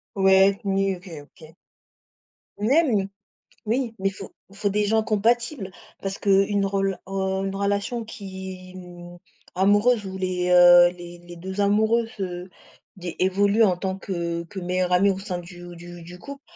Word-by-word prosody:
Ouais, 195 +1 +4
ni 195 0 +1
OK 180 +2 -14
OK. 155 +2 -17 1.0
Même! 225 -4 +2 0.6
Oui, 235 +1 -1
mais 195 - +1
il 195 - -6
faut 190 0 -10 0.2
faut 205 +1 -2
des 210 +1 0
gens 220 +1 +2
compatibles 230 0 0 0.3
parce 195 0 -4
qu'une 200 0 +2
rela 195 -1 -1
heu, 190 0 -2
une 195 - -4
relation 200 +4 -2
qui 190 -3 -9
mmh, 175 -1 -11 0.4
amoureuse 205 +4 +3
où 190 0 -6
les, 180 -1 -1
heu, 175 0 +8
les 175 -1 -11
les 175 0 -13
2 190 +3 -5
amoureux 220 +3 +2
se 180 -2 -5 0.5
di 180 -2 -6
évoluent 200 +4 +3
en 185 -5 +3
tant 190 +1 -4
que 170 -3 -3
que 180 +4 -10
meilleurs 180 0 -1
amis 195 +3 +4
au 190 - -2
sein 185 -3 -4
du 175 0 -11
du 175 0 -11
du 175 +2 -11
couple, 280 +4 -10
195 Hz, 160 wpm, -24 LUFS, 180-205 Hz, 1.0 s, heu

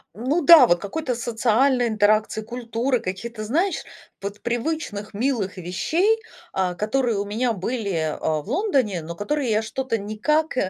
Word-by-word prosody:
Ну 280 +9 0
да, 305 -6 +9
вот 175 0 +3
какой-то 250 - -3
социальной 240 +2 +2
интеракции, 215 0 +2
культуры, 240 +2 -1
каких-то, 215 +4 -5
знаешь, 335 - 0 0.4
вот 200 +1 -6
привычных 235 -5 -3
милых 220 -6 -1
вещей, 320 - +1 0.3
а, 180 -2 0
которые 225 +2 0
у 200 - -1
меня 230 +4 0
были, 200 -2 -2 0.2
а, 155 -1 0
в - - -19
Лондоне, 260 - 0
но 170 +2 -7
которые 265 - -1
я 215 +1 +2
что-то 230 +1 -2
никак 235 +11 0
230 Hz, 145 wpm, -23 LUFS, 205-265 Hz, 0.4 s, да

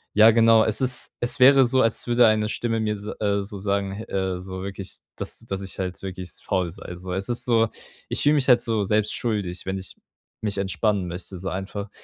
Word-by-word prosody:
Ja, 110 +1 +8
genau. 115 0 +5
Es 110 -1 +1
ist 130 -1 +1
es 120 +3 0
wäre 135 0 +7
so, 130 +2 +2
als 115 - +1
würde 120 -1 +5
eine 110 0 +2
Stimme 115 0 -2
mir 105 -1 -1
so, 105 - -6
äh 100 -1 +1
so 100 0 -7
sagen, 100 0 -1
he 110 +3 -6
äh, 95 -2 -2
so 95 0 -7
wirklich, 95 0 -7 0.2
dass - - -3
dass 95 0 -5
ich 95 0 -8
halt 90 -1 -3
wirklich 95 -1 -6
faul 90 -2 0
sei, 90 +1 -9
so. 90 +1 -7
Es 95 +4 -3
ist 120 - -2
so 115 -2 +3 0.4
ich - - -1
fühle 150 +1 +4
mich 140 -2 +1
halt 120 -2 +6
so 110 -3 0
selbst 105 +1 +1
schuldig, 100 -6 -3
wenn 95 0 -2
ich 95 - -6 0.5
mich 100 -2 -1
entspannen 100 -1 0
möchte 90 +1 -7
so 95 - -4
einfach. 100 +2 -5
100 Hz, 225 wpm, -24 LUFS, 95-115 Hz, 0.5 s, Ja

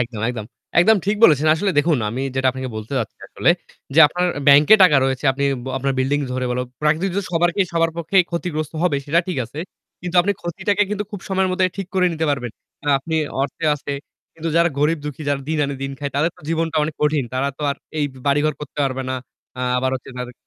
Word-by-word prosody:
একদম, 115 -3 -3
একদম, 115 -4 -4 0.4
একদম 220 +5 +5
ঠিক 210 - +1
বলেছেন। 155 - +5
আসলে 195 +5 0
দেখুন 150 -2 +3
আমি 120 +5 -3
যেটা 130 0 +1
আপনাকে 130 0 -5
বলতে 110 +5 -7
চাচ্ছি 110 -3 -4
আসলে - - +1 0.4
যে 160 - +3
আপনার 180 +3 -1 0.2
ব্যাংকে 145 +8 +8
টাকা 170 -6 +7
রয়েছে, 135 +1 -1
আপনি 140 +1 -2 0.3
আপনার 135 +1 0
বিল্ডিং 140 +3 +1
ধরে 130 0 -2
বললো। 125 +1 -1 0.2
প্রাকৃতিক 160 +6 +2 0.2
সবারকে 175 +3 +2
সবার 165 0 +2
পক্ষে 170 +3 -2
ক্ষতিগ্রস্ত 165 -3 -3
হবে 175 -5 +2
সেটা 165 +4 +3
ঠিক 175 - -2
আছে। 140 - -11 0.4
কিন্তু 180 0 -3
আপনি 200 +3 +1
ক্ষতিটাকে 190 +4 0
কিন্তু 210 0 -2
খুব 205 -4 -6
সময়ের 190 -1 +1
মধ্যে 185 0 +2
ঠিক 195 - -4
করে 185 -1 +3
নিতে 160 0 -2
পারবেন। 130 -4 -2 0.3
কারণ 145 0 +1
আপনি 160 +4 -5 0.3
অর্থে 140 +4 -4
আছে। 145 0 -5 0.4
কিন্তু 165 0 -4
যারা 170 0 +5
গরিব 150 +2 +2
দুঃখী 150 +1 -6
যারা 140 -1 0
দিন 160 - 0
আনে 140 0 -3
দিন 135 0 -3
খায় 145 -1 -3
তাদের 155 +4 +2
তো - - -18
জীবনটা 165 -1 -1
অনেক 150 +1 -2
কঠিন। 150 -2 +2
তারা 135 +2 0
তো 150 - -6
আর - - -3 0.2
এই 150 - +2 0.2
বাড়িঘর 145 +2 +2
করতে 150 0 -9
পারবে 135 0 -2
না। - - -1 0.4
আ - - -3 0.2
আবার 130 +1 0
হচ্ছে 130 0 -7
তাদে 125 0 -5
150 Hz, 215 wpm, -21 LUFS, 135-170 Hz, 0.4 s, ব্যাংকে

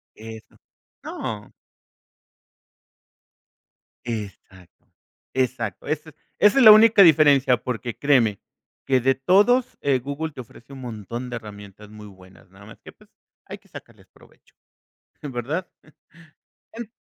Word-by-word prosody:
Eso. 110 0 -12 0.5
No. 105 -2 -7 2.5
Exacto. 100 -5 -9 0.5
Exacto. 125 -4 -3
Ese 155 +1 -4 0.2
esa 210 +6 +4
es 260 - +5
la 215 - +11
única 215 -1 +6
diferencia 145 -6 +5
porque, 120 -1 -6
créeme 120 -8 +2 0.5
que 130 -1 +2
de 135 +2 +2
todos, 210 - +2
eh, 140 -2 +1
Google 140 +5 -6
te 130 - -8
ofrece 120 +3 -18
un 135 - -11
montón 120 +2 -7
de 120 - -5
herramientas 105 -1 -12
muy 105 0 -12
buenas, 95 -1 -18
nada - - -17
más - - -15
que, - - -13
pues, - - -24 0.4
hay - - -8
que - - -30
sacarles - - -14
provecho. - - -25 0.7
Eh, 145 - -6
¿verdad? 140 +8 -4 1.1
En 230 -1 -8
130 Hz, 125 wpm, -22 LUFS, 110-155 Hz, 2.5 s, la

